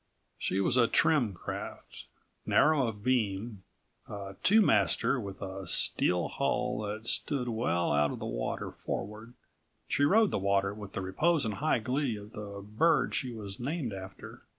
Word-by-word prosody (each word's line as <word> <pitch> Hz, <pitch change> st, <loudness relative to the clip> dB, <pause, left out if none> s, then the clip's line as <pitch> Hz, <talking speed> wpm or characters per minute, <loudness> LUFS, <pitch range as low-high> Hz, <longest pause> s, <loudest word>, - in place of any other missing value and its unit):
She 95 Hz, -, -1 dB
was 120 Hz, +6 st, +2 dB
a 120 Hz, -2 st, +5 dB
trim 125 Hz, -, +3 dB
craft. -, -, -7 dB, 0.4 s
Narrow 150 Hz, -5 st, +3 dB
of 105 Hz, -2 st, -6 dB
beam, 110 Hz, -4 st, 0 dB, 0.5 s
a135 100 Hz, -1 st, -7 dB
two 220 Hz, +3 st, +6 dB
master 105 Hz, -, +3 dB
with 100 Hz, -3 st, -7 dB
a 95 Hz, 0 st, -6 dB
steel 90 Hz, -1 st, +1 dB
hull -, -, -1 dB
that 105 Hz, +1 st, -5 dB
stood 125 Hz, +2 st, 0 dB
well 110 Hz, -7 st, 0 dB
out 75 Hz, 0 st, +3 dB
of -, -, -5 dB
the -, -, -6 dB
water -, -, -3 dB
forward, 110 Hz, +4 st, -6 dB, 0.5 s
she 145 Hz, -, +1 dB
rode 210 Hz, +8 st, +4 dB
the -, -, 0 dB
water 100 Hz, 0 st, +1 dB
with 100 Hz, -2 st, -9 dB
the -, -, -3 dB
repose 145 Hz, -, +1 dB
and 110 Hz, -, -1 dB
high 155 Hz, +7 st, +1 dB
glee 125 Hz, +2 st, -1 dB
of 105 Hz, +1 st, -10 dB
the 100 Hz, -2 st, -8 dB
bird 135 Hz, +11 st, +2 dB
she 130 Hz, -3 st, -1 dB
was 100 Hz, -4 st, -7 dB
named 135 Hz, -, -3 dB
after. 95 Hz, -1 st, -9 dB
105 Hz, 165 wpm, -30 LUFS, 100-125 Hz, 0.5 s, two